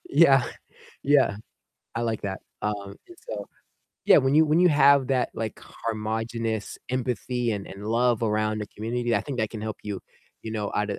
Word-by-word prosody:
Yeah, 135 Hz, -7 st, +6 dB, 0.6 s
yeah. 135 Hz, -7 st, +4 dB, 0.6 s
I 120 Hz, -, -1 dB
like 110 Hz, -2 st, -1 dB
that, 95 Hz, -1 st, -3 dB, 0.2 s
um, 100 Hz, -1 st, -3 dB
and, 350 Hz, 0 st, -14 dB
so, -, -, -5 dB, 0.6 s
yeah, -, -, +8 dB
when 135 Hz, +1 st, +2 dB
you 160 Hz, +1 st, +7 dB
when 155 Hz, +3 st, +3 dB
you 180 Hz, -, +6 dB
have 140 Hz, -2 st, +5 dB
that, 130 Hz, -2 st, +1 dB
like, 110 Hz, -2 st, -4 dB
homogenous 110 Hz, 0 st, -3 dB
empathy 125 Hz, -1 st, -1 dB
and 100 Hz, -1 st, -4 dB
and 100 Hz, +2 st, -8 dB
love 120 Hz, 0 st, +2 dB
around 110 Hz, 0 st, 0 dB
a -, -, -5 dB
community, 120 Hz, +2 st, -2 dB
I -, -, +1 dB
think 135 Hz, -4 st, -5 dB
that 110 Hz, 0 st, 0 dB
can 110 Hz, -, -6 dB
help 110 Hz, -2 st, -4 dB
you, 105 Hz, -2 st, -4 dB, 0.4 s
you 110 Hz, -, -5 dB
know, 105 Hz, -2 st, -3 dB
out 105 Hz, 0 st, 0 dB
of -, -, -3 dB
115 Hz, 185 wpm, -26 LUFS, 105-130 Hz, 0.6 s, yeah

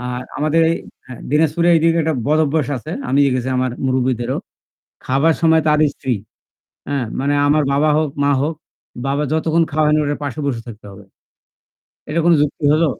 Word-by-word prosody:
আর 125 Hz, 0 st, -4 dB, 0.2 s
আমাদের 155 Hz, +2 st, +2 dB
এই -, -, +1 dB, 0.3 s
হ্যা, 130 Hz, -, -9 dB, 0.2 s
দিনাজপুরে 160 Hz, +3 st, +2 dB
এইদিকে 165 Hz, +1 st, +3 dB
একটা 160 Hz, 0 st, 0 dB
বদভ্যাস 155 Hz, -1 st, +1 dB
আছে। 140 Hz, +6 st, -8 dB, 0.2 s
আমি 135 Hz, -, +1 dB
দেখেছি 130 Hz, -1 st, -1 dB
আমার 130 Hz, 0 st, 0 dB, 0.2 s
মুরুব্বিদেরও। 130 Hz, -2 st, 0 dB, 0.7 s
খাবার 140 Hz, +5 st, +2 dB
সময় 160 Hz, -1 st, +4 dB
তার 150 Hz, 0 st, +3 dB, 0.2 s
স্ত্রী 130 Hz, -, -4 dB, 0.8 s
হ্যাঁ, 140 Hz, -3 st, -1 dB, 0.2 s
মানে 140 Hz, +2 st, 0 dB
আমার 150 Hz, +1 st, +3 dB
বাবা 145 Hz, +2 st, +2 dB
হোক, 155 Hz, 0 st, +1 dB, 0.2 s
মা 145 Hz, -, +3 dB
হোক। 155 Hz, +3 st, -1 dB, 0.5 s
বাবা 140 Hz, +2 st, 0 dB
যতক্ষণ 160 Hz, +1 st, +2 dB
খাওয়ায় 150 Hz, 0 st, +2 dB
না, -, -, +3 dB
ওটার 145 Hz, 0 st, -2 dB
পাশে 140 Hz, -2 st, -5 dB
বসে 125 Hz, -5 st, -2 dB
থাকতে 105 Hz, -2 st, -11 dB
হবে। 100 Hz, +1 st, -13 dB, 1.0 s
এটা 160 Hz, +3 st, 0 dB
কোন 175 Hz, -, +5 dB
যুক্তি 150 Hz, +1 st, -3 dB
হলো? 160 Hz, +2 st, +3 dB
145 Hz, 170 wpm, -18 LUFS, 130-160 Hz, 1.0 s, কোন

